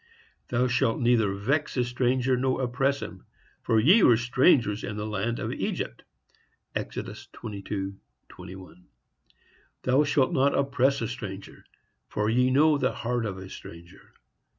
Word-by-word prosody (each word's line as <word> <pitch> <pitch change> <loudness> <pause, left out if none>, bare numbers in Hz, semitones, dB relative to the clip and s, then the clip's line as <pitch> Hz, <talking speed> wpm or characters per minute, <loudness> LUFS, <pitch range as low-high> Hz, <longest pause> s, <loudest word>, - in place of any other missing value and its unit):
Thou 125 +1 +1
shalt 125 -2 +1
neither 120 -4 +3
vex 140 +10 -1
a 125 - +3
stranger 125 +1 +1
nor 130 +1 0
oppress 135 +3 0
him; 95 - -9 0.4
for 110 - +2
ye 180 - +6
were 120 -9 +6
strangers 120 - +3
in 105 - -5
the 105 - -3
land 110 +3 -2
of - - -3
Egypt.—Exodus - - -7
22:21. 95 - -8 1.0
Thou 130 +3 +3
shalt 145 +1 +1
not 140 -2 +2
oppress 140 -1 +1
a 115 - -1
stranger, 105 -6 -8 0.4
for 105 +1 -1
ye 125 +2 +3
know 145 +3 +4
the - - +1
heart 120 -1 -2
of 95 -2 -5
a 95 0 -8
stranger. 85 0 -12
120 Hz, 135 wpm, -27 LUFS, 100-130 Hz, 1.0 s, ye